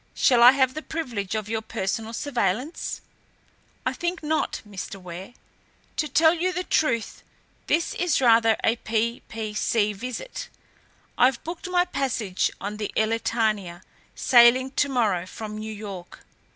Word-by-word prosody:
"Shall 245 -3 +4
I 245 +2 +10
have 260 -2 +2
the 310 - -5
privilege 235 - -4
of 215 -1 -3
your 220 0 -2
personal 220 +1 -3
surveillance?" 245 - -2 0.8
"I - - 0
think 345 -1 -3
not, 310 +1 -1
Mr. 195 -1 -7
Ware. 180 +5 -9 0.6
To 310 -1 0
tell 320 +3 +4
you 355 +2 0
the 365 0 -2
truth, 235 -11 0 0.5
this 335 - +1
is 355 -2 +1
rather 230 -3 +5
a 230 - +2
p.p.c. 220 -1 -1
visit. 250 - -6 0.7
I've 250 0 +4
booked 340 +2 -6
my 355 0 +3
passage 250 - -1
on 205 +2 -5
the 210 -1 -4
Elletania, 215 -5 0 0.3
sailing 250 +2 +5
to 280 +1 +1
morrow 210 -9 +1
from 215 +1 -7
New 220 0 -5
York. 200 -4 -9
230 Hz, 140 wpm, -25 LUFS, 210-275 Hz, 0.8 s, I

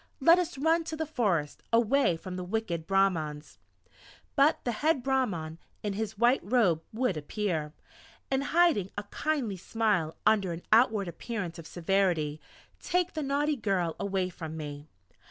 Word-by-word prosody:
Let 335 +5 +6
us 350 -4 -2
run 325 +4 +2
to 320 - -4
the 320 0 -2
forest, 200 - -1
away 235 -4 +3
from 180 +2 -7
the 180 - -4
wicked 180 -4 -3
Brahmans!" 170 -7 0 0.8
But 285 +2 +5
the 245 - 0
head 285 +3 +1
Brahman 200 -13 -1 0.2
in 205 -1 -1
his 220 +1 -4
white 240 +4 +4
robe 200 -8 +2
would 230 -5 0
appear, 155 -1 -2 0.6
and 270 +1 +1
hiding 330 - +3
a 205 - -2
kindly 240 -2 -2
smile 190 -5 0
under 200 -5 +3
an 170 - -8
outward 220 -3 +4
appearance 175 0 -5
of 160 - -9
severity, 170 -4 0 0.4
take 360 0 0
the 315 - -3
naughty 290 +2 +1
girl 190 - -1
away 190 -2 -1
from 160 -3 -7
me.... 145 -1 -7
205 Hz, 155 wpm, -29 LUFS, 170-265 Hz, 0.8 s, Let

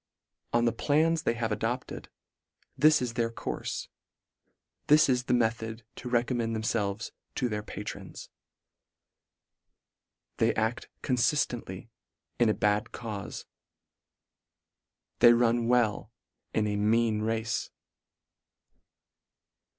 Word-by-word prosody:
On 120 0 +2
the 115 - +3
plans 155 +7 +2
they 120 -7 0
have 115 -2 -2
adopted, 120 +4 -3 0.7
this 155 -2 +5
is 120 -2 -3
their 115 -1 0
courfe. 115 - -4 1.0
This 150 +1 +6
is 125 -2 +1
the - - +1
method 115 -1 -1
to 125 - -6
recommend 120 -1 0
themfelves 110 -1 -2 0.2
to 125 - 0
their 105 -2 -3
patrons. - - -8 2.1
They - - +3
adf 110 +2 -1 0.2
coniiftently, 120 -5 0 0.5
in 120 -2 +4
a 110 - +2
bad 105 0 +1
caufe. 105 -4 -7 1.7
They 120 0 +8
run 120 0 +2
well 115 -2 +1 0.4
in 110 - +1
a 105 -1 -1
mean 110 +1 +2
race. 110 +1 -1
115 Hz, 105 wpm, -29 LUFS, 110-125 Hz, 2.1 s, They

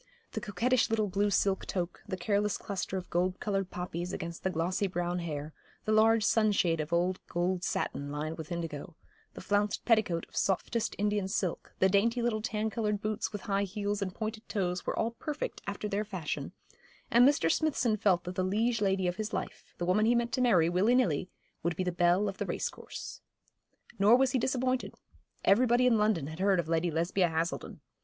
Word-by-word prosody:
The 220 - -4
coquettish 230 +6 +1
little 220 -1 +1
blue 200 +2 +1
silk 195 -1 +1
toque, 180 -2 -3
the 190 -2 -3
careless 205 +3 0
cluster 195 -1 -4
of 185 - -7
gold 180 +2 0
coloured 195 -3 -1
poppies, 180 0 -4
against 170 -2 -5
the 190 - +1
glossy 185 +3 0
brown 175 -1 -2
hair, 155 -3 -5 0.3
the 215 - 0
large 220 +1 +5
sunshade 205 -7 +3
of 155 +1 -3
old 180 +2 +1
gold 180 +1 -1
satin 140 -5 -2
lined 155 +2 -3
with 160 0 -7
indigo, 165 -2 -5 0.4
the - - -7
flounced 205 +1 0
petticoat 215 -8 +2
of - - -19
softest 205 +4 0
Indian 205 -1 0
silk, 190 -3 -3
the 190 - +4
dainty 215 +5 +2
little 235 -2 0
tan 220 -1 -2
coloured 210 -2 -1
boots 215 +2 -2
with 205 -2 -5
high 200 -1 0
heels 205 +1 -2
and 185 -2 -3
pointed 220 0 -5
toes, 180 -4 -2
were - - -1
all 225 +1 +1
perfect 295 +5 -5
after 200 +1 -3
their 205 0 -1
fashion; 185 -7 -4 0.6
and 235 +1 +6
Mr. 165 - +2
Smithson 265 -8 +1
felt 190 -4 +2
that 180 - -5
the 185 - -1
liege 225 +5 +1
lady 190 -2 +1
of 175 +1 -2
his 215 +1 -4
life, - - -5
the 175 - -2
woman 210 +5 +3
he 240 - +4
meant 235 0 0
to 255 - 0
marry 185 -10 +4
willy 190 +8 +3
nilly, 185 - +1 0.3
would 170 0 -1
be 185 - -1
the 180 - -1
belle 175 +4 +3
of 195 -1 -5
the - - -1
race - - -1
course. - - -9 0.8
Nor 205 +4 +7
was 260 0 +3
he 260 - +1
disappointed. 255 0 -1 0.5
Everybody 240 +4 +4
in 235 -3 +4
London 210 -8 +2
had 160 +3 -7
heard 195 -1 +3
of 165 - -1
Lady 165 +1 +1
Lesbia 170 +3 +1
Haselden. 165 +2 -3
195 Hz, 200 wpm, -30 LUFS, 175-220 Hz, 0.8 s, Nor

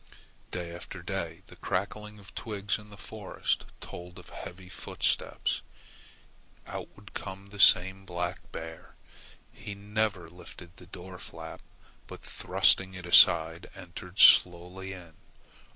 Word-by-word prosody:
Day 85 -2 -5
after 85 - -9
day - - -4
the - - -14
crackling 105 +3 -3
of 100 0 -14
twigs 105 -2 -2
in 105 0 -14
the 100 - -12
forest 105 -1 -3 0.2
told 90 0 -9
of - - -12
heavy 90 +1 -9
footsteps. - - -1 1.0
Out - - -6
would 100 -1 -15
come 95 0 -7
the 100 0 -11
same 95 0 +6
black 90 -1 -4
bear. 80 0 -8 0.6
He 105 -2 -8
never 105 -3 -1
lifted 90 0 -13
the 90 - -14
door 90 +1 -9
flap, 95 - -8 0.5
but - - -10
thrusting 95 0 +3
it 90 -1 -8
aside 80 -1 +6
entered 90 0 -10
slowly 90 +1 +6
in. 85 -3 -11
95 Hz, 130 wpm, -29 LUFS, 90-100 Hz, 1.0 s, same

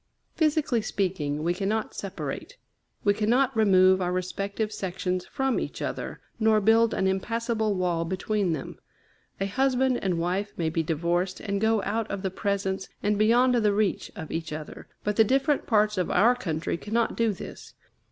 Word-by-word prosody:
Physically 300 -7 +1
speaking, 170 -8 -2
we 170 +2 +1
cannot 210 +4 -2
separate; 195 - -6 0.5
we 205 - +4
cannot 240 +5 +2
remove 190 -3 +5
our 180 0 0
respective 200 +4 -2
sections 185 -2 -3
from 270 -1 0
each - - -5
other, - - -4 0.2
nor 220 -1 +4
build 225 +2 +4
an 190 - 0
impassable 220 +2 0
wall 175 -3 0
between 190 +2 -1
them. 155 -4 -5 0.6
A 195 - 0
husband 260 +3 +1
and 185 -3 0
wife 185 +5 -1
may 160 -2 0
be 165 - 0
divorced, 170 +4 -1
and 200 -1 -2
go 220 -2 +2
out 220 +2 -2
of 200 - -4
the 190 - -1
presence 195 -1 -2
and 205 +1 +2
beyond 240 +4 +4
the 215 -4 +3
reach 205 -1 0
of 160 - -7
each 165 -1 -4
other, 155 0 -7 0.2
but 210 0 -1
the 225 - +7
different 270 +5 +1
parts 210 -3 +2
of 180 - 0
our 225 +7 +5
country 165 -8 -2
cannot 225 +5 -1
do 230 -1 +2
this. 190 - -9
200 Hz, 170 wpm, -26 LUFS, 185-225 Hz, 0.6 s, the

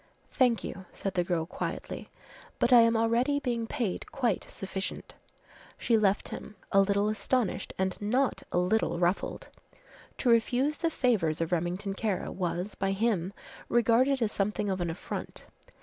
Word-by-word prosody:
"Thank 245 -3 +3
you," 190 - -6
said 195 - -3
the 180 - +1
girl 170 -2 -1
quietly, 170 - -5 0.5
"but 250 - +3
I 240 - +10
am 230 0 +4
already 235 +5 +2
being 235 -5 -2
paid 220 -7 -3
quite 240 -8 -1
sufficient." 190 0 -5 0.6
She 235 - +2
left 205 -2 +2
him, 215 - -8 0.2
a 195 - +6
little 200 +1 +2
astonished 215 -1 0
and 190 +1 -1
not 245 +6 +1
a - - 0
little 180 +2 +2
ruffled. 175 +2 -1 0.7
To 250 - +1
refuse 250 +5 +2
the 335 - +1
favours 215 - +1
of 165 0 -1
Remington 180 +3 -1
Kara 200 -1 -2
was, 180 +2 -2
by 195 0 -1
him, 195 -4 0 0.4
regarded 240 +3 +3
as 215 - 0
something 205 0 -1
of 185 -1 -2
an 175 - -1
affront. 165 - -6
210 Hz, 155 wpm, -29 LUFS, 185-235 Hz, 0.7 s, I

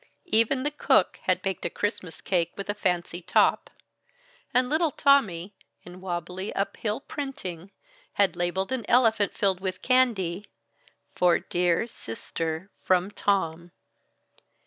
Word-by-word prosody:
Even 255 -3 +2
the 295 - 0
cook 295 - +2
had - - +1
baked 195 -1 -2
a - - -1
Christmas 195 -5 -4
cake 170 -3 0
with 195 - -5
a - - -4
fancy 180 -3 -1
top. - - +2 0.8
And 250 0 +3
little 315 +4 +2
Tommy, 210 - +2 0.3
in 180 +1 -12
wobbly 180 +2 -4
uphill 210 +4 -2
printing, 200 - -6 0.4
had 200 -1 +2
labeled 180 +4 -1
an 260 -3 -1
elephant 225 -4 +3
filled 195 -3 +1
with 185 -1 -4
candy, 210 -8 +2 0.7
"FOR 180 -1 +4
DERE 175 +3 0
CISTER 165 - -5
FROM 185 +1 +2
TOM." 175 -5 0
190 Hz, 125 wpm, -26 LUFS, 175-230 Hz, 0.8 s, FOR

